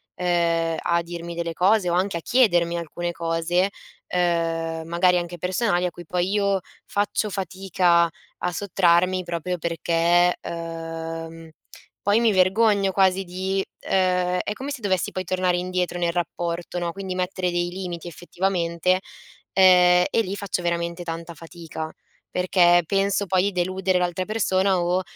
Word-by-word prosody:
uhm, 170 -2 +1
a 170 0 +1
dirmi 170 0 -7
delle 170 0 -3
cose 185 +1 +3
o - - 0
anche 185 0 0
a - - -6
chiedermi 175 -9 +3
alcune 175 +1 -4
cose, 170 +3 0 0.4
uhm, 165 -2 0
magari 180 +1 +3
anche 175 0 -4
personali 180 +1 0
a 180 - -1
cui 175 0 -11
poi 180 +3 -1
io 200 -2 +1 0.3
faccio 205 +1 -1
fatica 185 -3 +1 0.3
a 180 - -1
sottrarmi 185 0 +2
proprio 175 +1 -3
perché, 170 +1 +2
uhm, 165 -1 -5
mhmm, 165 -1 -12 0.5
poi 205 +2 +3
mi 230 -2 +4
vergogno 195 +1 +3
quasi 190 0 +3
di, 190 +2 -2 0.3
uhm, 180 -1 +2
è 210 - -2
come 270 +6 -6
se 265 -4 -6
dovessi 190 -3 0
poi 185 - -3
tornare 185 0 +1
indietro 180 -1 -2
nel 170 -1 0
rapporto, 175 0 -3
no, 170 -1 -2
quindi 195 -2 -5
mettere 180 0 -1
dei 175 0 -1
limiti 175 -2 -6
effettivamente, 175 +1 -1 0.5
ehm, 180 -1 +6
e 225 - +2
lì 195 -1 -4
faccio 200 -3 -3
veramente 170 0 -2
tanta 165 0 -6
fatica 160 -1 -8 0.4
perché 175 -1 +4
penso 200 0 +1
poi 185 +2 +2
i - - -1
deludere 185 0 0
l'altra 180 +1 -1
persona 190 -3 +1
o, 175 +2 +1
180 Hz, 150 wpm, -23 LUFS, 170-190 Hz, 0.5 s, ehm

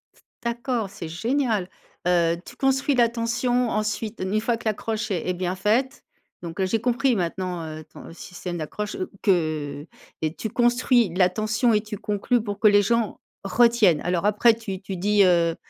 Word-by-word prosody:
S - - -25 0.2
d'accord, 235 -2 -2
c'est 190 -4 -8
génial! 220 - -1 0.4
Heu, 170 -1 +3
tu - - -11
construis 270 +1 +1
l'attention, 240 +1 +1
ensuite, 215 +1 -2
une 195 +3 0
fois 230 +1 0
que 235 - -15
l'accroche 220 0 -2
est 180 -2 -2
est 180 - +1
bien 180 +1 -2
faite. 235 +8 0 0.4
Donc, 170 +2 -7
heu, - - +3
j'ai 225 +4 0
compris, 245 +2 +1
maintenant, 180 -1 -3
heu, 155 0 -7
ton - - -11
système 175 0 -7
d'accroche, 205 +7 -5 0.3
que 155 -6 0 0.4
et 155 0 -1
tu 220 - -4
construis 240 -2 +3
l'attention, 215 +6 +2
et 210 - +3
tu 210 -1 -7
conclus 215 +3 0
pour 205 -2 -5
que 215 - +5
les 205 0 +6
gens 230 0 0 0.2
retiennent. 215 -5 +4
Alors 180 +1 -1
après, 210 +3 +5
tu 205 -4 -6
tu 195 -1 -6
dis, 205 +2 +3
heu, 170 -2 +3
210 Hz, 170 wpm, -24 LUFS, 180-235 Hz, 0.4 s, les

